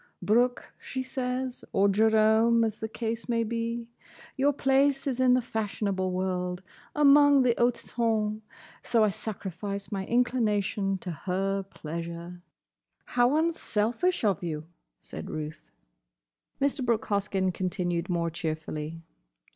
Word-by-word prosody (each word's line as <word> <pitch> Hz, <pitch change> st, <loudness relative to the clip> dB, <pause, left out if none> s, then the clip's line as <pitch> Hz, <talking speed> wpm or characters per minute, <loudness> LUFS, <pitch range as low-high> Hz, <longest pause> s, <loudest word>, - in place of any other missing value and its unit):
'Brooke,' 245 Hz, +4 st, +1 dB
she 260 Hz, -1 st, -4 dB
says—or 250 Hz, -5 st, -1 dB
'Jerome,' 220 Hz, +2 st, +4 dB
as 220 Hz, -1 st, -2 dB
the 220 Hz, -, -3 dB
case 225 Hz, +2 st, -4 dB
may 230 Hz, -1 st, +2 dB
be—'your 235 Hz, +4 st, -3 dB
place 275 Hz, 0 st, +2 dB
is 260 Hz, -3 st, -1 dB
in 255 Hz, -1 st, +5 dB
the 255 Hz, -, +1 dB
fashionable 200 Hz, -4 st, -2 dB
world, 180 Hz, 0 st, -2 dB, 0.3 s
among 285 Hz, -1 st, +6 dB
the 245 Hz, -2 st, +4 dB
hote 240 Hz, 0 st, +2 dB
tonn.' 220 Hz, -2 st, 0 dB, 0.4 s
So 230 Hz, -2 st, +3 dB
I 210 Hz, -, +3 dB
sacrifice 200 Hz, 0 st, -5 dB
my 195 Hz, -2 st, -3 dB
inclination 210 Hz, -5 st, +1 dB
to 180 Hz, -, -4 dB
her 195 Hz, +4 st, -1 dB
pleasure." 170 Hz, -1 st, -7 dB, 0.7 s
"How 245 Hz, +4 st, +4 dB
unselfish 320 Hz, -1 st, 0 dB
of 200 Hz, -6 st, +2 dB
you!" 155 Hz, -3 st, -4 dB, 0.3 s
said -, -, -8 dB
Ruth. 155 Hz, 0 st, -6 dB, 0.9 s
Mr. 275 Hz, -1 st, 0 dB
Brooke 235 Hz, -2 st, +1 dB
Hoskyn 195 Hz, -2 st, 0 dB
continued 175 Hz, -1 st, -2 dB
more 170 Hz, -1 st, 0 dB
cheerfully. 155 Hz, 0 st, -4 dB
215 Hz, 120 wpm, -28 LUFS, 185-245 Hz, 0.9 s, among